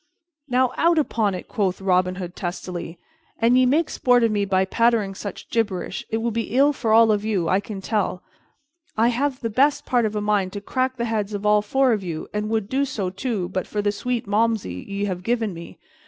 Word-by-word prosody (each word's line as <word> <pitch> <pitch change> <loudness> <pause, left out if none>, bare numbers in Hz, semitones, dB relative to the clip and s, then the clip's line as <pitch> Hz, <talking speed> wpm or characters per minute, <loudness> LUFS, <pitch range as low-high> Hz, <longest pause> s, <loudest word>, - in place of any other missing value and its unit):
"Now 250 -1 +2
out 335 0 +3
upon 220 -9 +1
it," 180 - -7
quoth 190 -3 -1
Robin 185 -1 +1
Hood 180 -1 -6
testily, 175 -1 -5 0.4
"an 230 +2 +3
ye 255 0 +5
make 305 +5 +2
sport 245 -1 +2
of 230 - +3
me 205 -1 +1
by 190 -1 +2
pattering 225 -1 +2
such 195 0 -7
gibberish, 205 -5 -1
it 225 - 0
will 230 +1 -1
be 230 +2 -3
ill 285 +2 +5
for 235 -5 -3 0.3
you 205 -5 -1
all, - - -1
I 190 - +4
tell 200 -2 -3
you. - - -36 0.6
I 230 +2 +4
have 260 +2 -1
the 230 - -2
best 275 +6 +2
part 245 -2 +2
of 215 - -6
a - - 0
mind 205 -3 0
to 205 - -4
crack 255 +5 -2
the 235 - -1
heads 215 -2 -2
of 205 +1 -5
all 210 0 +4
four 260 +4 +2
of 210 -3 -2
you, 165 -3 -5
and 210 0 -2
would 220 -3 -1
do 265 +5 0
so, 200 -9 -3
too, 195 -3 -3
but 185 -1 -3
for 205 -1 -2
the 205 - +2
sweet 240 +3 -3
Malmsey 210 - 0
ye 200 +1 -2
have 185 -3 -3
given 225 0 -1
me. 170 0 -10
210 Hz, 220 wpm, -23 LUFS, 190-240 Hz, 0.6 s, ye